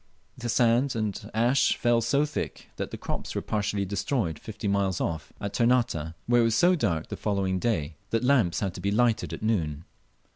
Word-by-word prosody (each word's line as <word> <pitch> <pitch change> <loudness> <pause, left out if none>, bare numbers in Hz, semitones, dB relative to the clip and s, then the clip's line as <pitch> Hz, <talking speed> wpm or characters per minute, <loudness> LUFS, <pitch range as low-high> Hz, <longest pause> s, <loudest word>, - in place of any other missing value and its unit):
The 120 -1 -5
sand 120 +3 +3
and 110 -3 -3
ashes 120 +4 +3
fell 120 -1 +2
so 140 +6 +2
thick 150 - -5
that - - -3
the - - -6
crops - - -5
were - - 0
partially 105 -1 -1
destroyed 100 - -1
fifty 110 -1 -6
miles 100 -2 +1
off, 80 -2 -3
at 100 - -4
Ternate, 115 -10 +1
where 120 0 +4
it - - +3
was 115 -1 +2
so 175 +10 +5
dark 85 - -1
the - - -4
following 95 -3 -1
day 85 -9 -1
that 115 +2 0
lamps 125 -10 +3
had 95 -3 -1
to - - -8
be 100 - 0
lighted 115 +2 +2
at - - -6
noon. 80 -9 -1
110 Hz, 195 wpm, -27 LUFS, 95-120 Hz, -, so